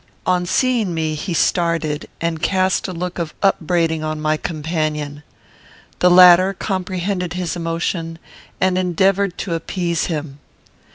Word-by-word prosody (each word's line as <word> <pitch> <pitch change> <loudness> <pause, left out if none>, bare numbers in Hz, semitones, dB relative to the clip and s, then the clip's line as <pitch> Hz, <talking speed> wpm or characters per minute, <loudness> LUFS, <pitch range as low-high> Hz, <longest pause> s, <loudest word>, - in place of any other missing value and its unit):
On 180 -1 +1
seeing 230 -4 +1
me 160 -1 -1
he 155 +5 -4
started, 165 -2 0
and 165 -1 -2
cast 190 0 +1
a - - -4
look 180 +1 -5
of 165 -2 -4
upbraiding 165 -4 +1
on 155 0 -3
my 155 0 +1
companion. 155 -2 -3 0.8
The 180 - +5
latter 180 +1 +7
comprehended 185 -2 -3
his 180 -1 -3
emotion, 165 0 -3 0.4
and 185 0 +2
endeavoured 190 +1 +1
to 180 - -3
appease 170 +1 -2
him. 150 -4 -5
170 Hz, 130 wpm, -19 LUFS, 160-185 Hz, 0.8 s, latter